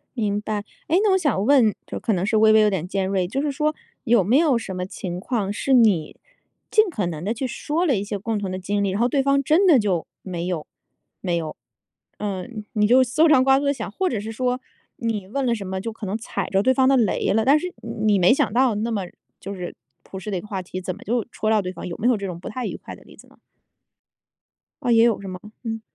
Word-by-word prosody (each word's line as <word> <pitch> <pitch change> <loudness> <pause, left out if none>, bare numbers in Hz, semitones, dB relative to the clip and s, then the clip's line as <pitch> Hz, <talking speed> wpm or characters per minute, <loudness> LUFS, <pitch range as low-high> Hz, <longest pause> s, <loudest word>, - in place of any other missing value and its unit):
明 205 -3 -1
白。 210 -1 -3 0.2
诶 345 - +3
那 420 - +4
我 380 - +4
想 290 - 0
问 245 -5 +5
就 - - -6
可 220 - 0
能 185 -1 0
是 220 +2 +1
微 215 0 +6
微 220 - +6
有 210 - +4
点 185 -4 -2
尖 190 0 -1
锐， 190 -2 0
就 270 +9 -2
是 295 0 -1
说 305 +2 0 0.3
有 235 -5 +4
没 225 +9 +3
有 300 -6 +4
什 195 -5 -5
么 180 0 -3
情 180 -1 -6
况 200 -1 -2
是 250 +6 0
你 210 -11 +3 0.5
尽 435 -2 +4
可 215 - -2
能 165 -2 -4
地 210 +4 -1
去 255 +3 -3
说 300 +7 -2
了 285 -7 +3
一 195 - -1
些 205 0 -4
共 220 +2 -2
同 195 -2 -4
的 185 - -4
经 200 +2 -1
历， 200 - +1
然 190 +2 -2
后 240 - +4
对 275 +2 +1
方 275 0 +3
真 315 +8 +3
的 305 -8 +7
就 190 -6 0 0.2
没 175 -2 -4
有 175 -4 -3 0.5
没 180 -3 -1
有。 160 -2 -4 0.6
嗯， 210 +2 -5
你 210 -1 +2
就 255 +3 +6
搜 300 +6 +3
肠 270 -5 +5
刮 270 0 +5
肚 285 - -3
地 280 - +2
想， 220 -7 -6
或 375 - -1
者 225 - -2
是 215 +2 -5
说 250 +2 -1 0.4
你 225 -7 -3
问 275 +7 -2
了 240 -2 +2
什 205 -3 -6
么 190 0 -4
就 230 - -4
可 220 -1 -8
能 195 +2 -2
踩 230 - -4
着 195 - +2
对 260 +5 +3
方 260 0 +3
的 270 - +5
雷 220 -5 +1
了， 220 +1 +2
但 285 +3 +5
是 360 +2 -5 0.3
你 205 -2 +4
没 180 - +5
想 275 -6 0
到 250 -2 +3
那 220 +3 -2
么 210 -3 -1 0.4
就 200 +1 -6
是 180 -2 -6 0.3
朴 190 - -8
实 200 - -7
的 195 - -1
一 - - -4
个 - - -12
话 195 -3 -3
题， 185 0 -6
怎 185 -1 -4
么 - - -15
就 235 +1 -1
戳 215 - -2
到 220 -1 +3
对 185 - -4
方。 170 - -7
有 170 - -6
没 230 - 0
有 250 - +4
这 200 -1 -4
种 175 -2 -6
不 - - -9
太 250 +2 -4
愉 - - -5
快 - - -10
的 - - -18
例 - - -16
子 - - -16
呢？ - - -23 1.5
啊 245 - +1
也 230 -1 +6
有 230 -4 +1
是 195 - -8
吗？ 185 0 -7 0.2
嗯。 225 -1 -4
215 Hz, 290 characters per minute, -23 LUFS, 195-255 Hz, 1.5 s, 的